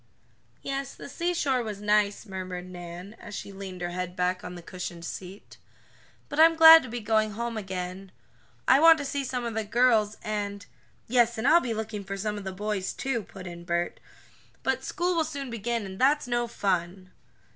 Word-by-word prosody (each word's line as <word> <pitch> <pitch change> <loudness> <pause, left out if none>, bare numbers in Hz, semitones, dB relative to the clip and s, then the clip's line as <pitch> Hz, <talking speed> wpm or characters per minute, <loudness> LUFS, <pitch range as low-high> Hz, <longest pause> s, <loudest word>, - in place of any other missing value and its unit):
"Yes, 275 0 -4
the - - -9
seashore 290 -4 0
was 215 -3 -5
nice," 210 0 +1
murmured 185 -2 -6
Nan, 175 +2 -9
as 210 -3 -9
she - - -6
leaned 190 -2 -8
her 175 0 -2
head 180 0 -4
back 180 0 0
on 180 - -7
the 175 - -10
cushioned 175 -1 -6
seat, 190 +3 -8 0.7
"but 290 - -4
I'm 330 +1 +7
glad 325 0 +10
to 255 - -8
be 240 +2 -4
going 215 0 +1
home 235 +2 -3
again. 190 -2 -5 0.6
I 265 - +7
want 325 +1 +8
to 290 - -4
see 280 0 -2
some 250 -2 -3
of 230 - -3
the 220 0 -1
girls, 220 -1 +3
and 205 -2 -3 0.2
" - - -37
"Yes, 235 -1 +3
and 220 - 0
I'll 340 +2 +7
be 235 -3 -2
looking 215 -1 -4
for 195 +1 -5
some 210 +1 -2
of 205 -1 -7
the 190 - -3
boys, 200 0 -3
too," 265 -4 -2
put 190 -1 -11
in 170 -1 -8
Bert. 175 0 -2 0.6
"But - - 0
school 355 +1 -1
will 325 - +3
soon 280 -5 -5
begin, 235 0 -2
and 190 0 -8
that's 285 +3 +3
no 240 0 0
fun!" 185 -3 -2
210 Hz, 200 wpm, -27 LUFS, 185-250 Hz, 0.7 s, glad